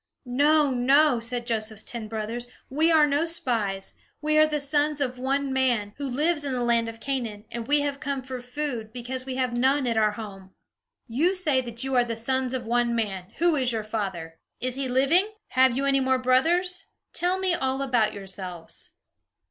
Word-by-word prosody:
"No, 290 +3 +3
no," 260 +2 +4
said 240 +1 0
Joseph's 220 -2 -1
ten 230 -3 -4
brothers. 225 +2 -4 0.2
"We 315 +4 +3
are 315 -2 +6
no 295 +3 +1
spies. 215 -11 -1 0.3
We 305 +1 0
are 310 - +6
the 300 -1 -1
sons 290 +1 +1
of 255 -3 -2
one 270 +1 -1
man, 240 -6 +1
who 280 0 -3
lives 295 +4 +1
in 275 -2 -2
the 245 -1 -1
land 235 -1 +2
of 225 0 -10
Canaan; 230 -6 -3
and 235 -1 -5
we 290 +1 +3
have 285 -1 -2
come 275 -1 -3
for 255 -1 -6
food, 245 -3 -4
because 255 +2 -5
we 260 - -3
have 255 -2 -1
none 265 +3 +2
at 230 -2 0 0.2
home." 195 -4 -9 0.5
"You 310 +11 +1
say 305 -8 +2
that 235 0 -1
you 270 0 -2
are 245 - +5
the 235 -1 -3
sons 260 +2 -1
of 245 -2 -4
one 240 0 +1
man, 195 -5 -2
who 340 -1 +3
is 255 -3 +1
your 220 -1 -2
father? 190 -7 -4 0.2
Is 255 +1 -1
he 270 +1 -2
living? 320 +12 +3 0.2
Have 260 -1 +3
you 275 - 0
any 275 0 +3
more 260 0 +2
brothers? 345 +9 +1 0.3
Tell 355 +2 0
me 380 -1 +1
all 265 -3 -1
about 240 -5 +2
yourselves." 185 -4 -7
255 Hz, 195 wpm, -26 LUFS, 230-285 Hz, 0.5 s, are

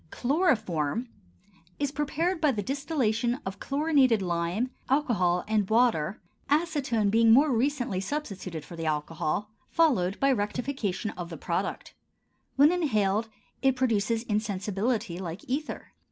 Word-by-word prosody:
CHLOROFORM 235 - 0 0.7
is 285 -1 -1
prepared 315 +4 -1
by 300 -3 +4
the 210 -5 -3
distillation 255 -3 0
of 190 +1 -5
chlorinated 280 -5 +3
lime, 175 +6 -1 0.2
alcohol, 205 -11 +2
and 210 -3 +1
water, 220 -7 +2 0.3
acetone 285 -9 +1
being 225 +1 +5
more 280 +5 +6
recently 245 -5 0
substituted 195 - -5
for 170 - -10
the 165 -1 -4
alcohol, 155 +6 -2 0.2
followed 220 - +2
by 275 0 +3
rectification 215 -3 -2
of 175 -2 -7
the 165 - -7
product. - - -3 0.6
When 285 +3 +6
inhaled 220 - +1 0.3
it 265 -1 +3
produces 230 -3 +1
insensibility 210 -2 -1
like 175 -1 -6
ether. 285 +5 -4
225 Hz, 125 wpm, -28 LUFS, 190-275 Hz, 0.7 s, more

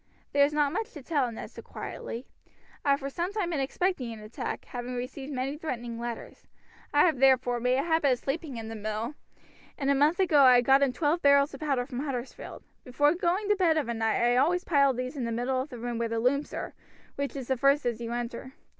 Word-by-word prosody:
"There 285 0 +5
is 285 - +3
not 295 -1 +1
much 445 +4 -3
to 295 - -10
tell," 275 -5 0
Ned 225 - -8
said - - -11
quietly. 240 +3 -7 0.6
"I - - 0
have 280 0 +4
for 275 - -3
some 345 +6 -2
time 405 -5 -2
been 310 - -1
expecting 270 -2 -1
an 225 - -7
attack, 215 +1 -5
having 245 0 -6
received 260 +3 -5
many 270 +2 -2
threatening 240 -7 -4
letters. 235 -1 -7 0.4
I 290 - +4
have, 315 -7 +1
therefore, 255 -2 +4
made 250 +2 +2
a 275 - +1
habit 320 -5 +3
of - - -2
sleeping 275 0 -4
in 225 -1 -6
the 225 - -6
mill, 215 +4 -3 0.6
and 275 -1 +1
a - - +5
month 295 +6 +3
ago 325 -6 +5
I 250 -2 +7
got 270 +3 +4
in 275 -2 +3
twelve 310 +5 0
barrels 280 0 +4
of 275 - -8
powder 275 -5 0
from 250 -1 -6
Huddersfield. 265 -3 -5 0.2
Before 290 +4 +2
going 360 +4 0
to 415 - +5
bed 345 -5 +3
of 300 - 0
a - - 0
night 225 0 0
I 240 +1 +3
always 345 +7 +2
pile 280 -4 +4
these 255 +2 -4
in 265 - -3
the 230 - -2
middle 250 +3 0
of 270 - -6
the 245 - -8
room 235 0 -4
where 230 -1 -1
the 230 - -2
looms 280 +5 +1
are, - - -5 0.4
which 280 0 -4
is 265 -3 -5
the 265 - +3
first 275 +3 +3
as 235 -1 -1
you 230 0 -4
enter. 240 +2 -5
270 Hz, 240 wpm, -28 LUFS, 245-295 Hz, 0.6 s, I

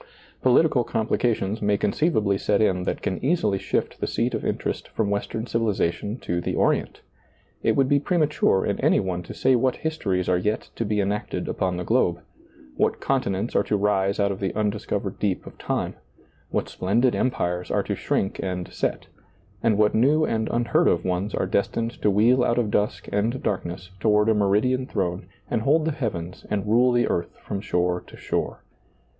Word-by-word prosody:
Political 130 0 +4
complications 110 -2 0
may 105 0 +2
conceiv 150 - +1
ably 100 -2 +2
set 100 +1 +1
in 90 -4 +2
that - - -3
can 95 +2 -2
easily 120 - +1
shift - - -2
the - - -1
seat - - -1
of - - -2
interest - - -2
from 105 -2 -1
western 110 +2 -2
civilization 105 -2 -1
to 85 -7 -2
the - - -2
Orient. - - 0 0.6
It - - +2
would 135 -1 +3
be 140 +1 +3
premature 150 - +2
in - - -1
any - - +3
one 90 -2 -2
to 85 - -9
say 130 0 +3
what 130 +1 +2
histories 100 - -2
are 90 -1 +2
yet 105 +4 -2
to 115 - -1
be 105 0 0
enacted 100 +1 -2
upon 90 -1 -1
the 90 - -3
globe; 90 -5 +2 0.6
what - - +1
conti 135 -4 0
nents 95 +5 -2
are - - +5
to 105 - 0
rise 100 -1 +1
out 100 0 +2
of 95 - -5
the 95 -2 -2
undiscovered 105 -2 -2
deep 100 -3 -1
of - - -12
time; - - -2 0.6
what - - -1
splendid 115 +7 +1
empires 90 -8 -1
are - - +1
to - - -2
shrink 95 - -1
and 90 -2 -4
set; - - -2 0.6
and 110 -3 +2
what 105 0 +3
new 150 +7 +4
and 110 -4 -1
unheard 120 +8 +2
of 85 - +2
ones 95 +3 -1
are - - 0
des 100 - +1
tined 115 +1 -3
to 105 - +3
wheel 115 +6 +4
out 120 - +1
of 115 -4 +1
dusk 105 0 0
and 115 +6 0
darkness 90 -1 -3
toward 105 +1 +3
a - - +5
meridian 110 +6 +2
throne 90 -2 -2 0.2
and 110 - +1
hold 150 +6 +3
the 160 - +1
heavens 95 - -4
and 100 -1 -1
rule 120 +4 +4
the 120 0 +3
earth 85 0 -2
from 100 - -4
shore 90 -3 0
to - - -13
shore. - - -3
105 Hz, 195 wpm, -24 LUFS, 95-120 Hz, 0.6 s, are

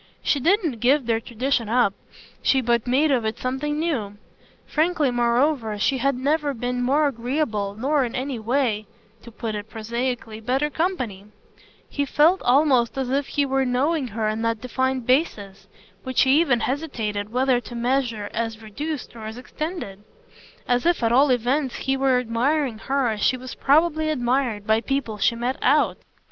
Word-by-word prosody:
She 285 - +2
didn't 330 - +1
give 265 +3 +3
their 225 -1 +1
tradition 235 0 -1
up; 235 -4 +3 0.5
she 270 - +3
but 235 -1 +1
made 280 +5 +3
of 250 -4 +2
it 220 0 -2
something 270 +4 -2
new. 250 -11 -2 0.5
Frankly 310 -3 +1
moreover 240 -1 +1
she 265 +6 +1
had 275 +2 +1
never 285 +2 0
been 245 +1 -2
more 280 +5 +2
agreeable 230 -5 -2
nor 275 +5 +1
in 240 - -4
a 260 -1 -3
way 225 -2 0 0.3
to 235 - -12
put 225 -1 -5
it 210 0 -6
prosaically 230 0 -4
better 265 +6 0
company: 255 - -2 0.6
he 285 - -2
felt 310 +6 +3
almost 260 -2 +3
as 260 -2 -2
if 275 +1 0
he 285 - 0
were 270 0 +1
knowing 265 +3 0
her 220 -1 -2
on 215 +1 -2
that 230 -1 -1
defined 260 0 -1
basis 205 - 0 0.3
which 260 +2 0
he 270 +4 +5
even 255 -8 +2
hesitated 220 -8 -3
whether 255 0 +2
to 240 +1 -10
measure 235 -3 -1
as 225 -1 -3
reduced 285 +6 -5
or 220 -2 -7
as 220 +2 -7
extended; 255 - -6 0.6
as 245 0 +2
if 345 -7 +1
at 230 - +2
all 270 +4 +5
events 255 +2 +1
he 270 0 -1
were 265 -1 +2
admiring 250 +1 0
her 270 0 0
as 215 -2 -3
she 255 - +2
was 255 0 -8
probably 310 +2 +2
admired 245 -6 0
by 220 +1 +2
people 245 -5 -2
she 235 - +2
met 245 +3 -2
"out." - - +3
250 Hz, 170 wpm, -23 LUFS, 230-280 Hz, 0.6 s, he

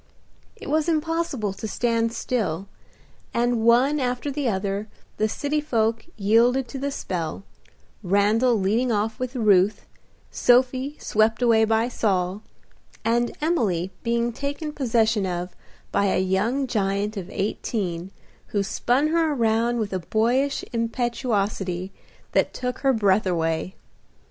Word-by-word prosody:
It - - -10
was 310 +3 +1
impossible 320 - -1
to 220 - -6
stand 230 0 0
still, 200 -7 -2 0.7
and 240 -1 +1
one 250 +6 +4
after 250 +2 -1
the 275 -3 -1
other 200 +1 -2 0.3
the 215 0 +1
city 295 +6 -1
folk 230 -3 0
yielded 235 +5 +3
to 270 - -6
the 280 +1 -1
spell, 180 - -4 0.6
Randal 210 +5 +3
leading 225 +6 +1
off 220 +2 -1
with 255 +1 -4
Ruth, 205 -4 +3 0.5
Sophie 255 +3 +2
swept 220 +3 +1
away 225 -2 +5
by 225 +1 +2
Saul, 195 -4 -1 0.6
and 235 +1 +1
Emily 205 - 0
being 235 0 0
taken 285 +4 -4
possession 225 -7 +1
of 180 0 -4 0.4
by 200 - +2
a 195 - +2
young 200 +9 +1
giant 205 -2 -1
of 190 -2 -6
eighteen, 195 -3 -3 0.4
who 200 -1 0
spun 250 +8 +1
her 325 -1 +2
around 230 -1 +1
with 215 -4 -2
a 185 - 0
boyish 240 +9 0
impetuosity 215 -6 -1 0.4
that - - +1
took 250 0 -3
her 270 - +3
breath 205 -4 +2
away. 165 +1 -1
225 Hz, 130 wpm, -24 LUFS, 200-255 Hz, 0.7 s, away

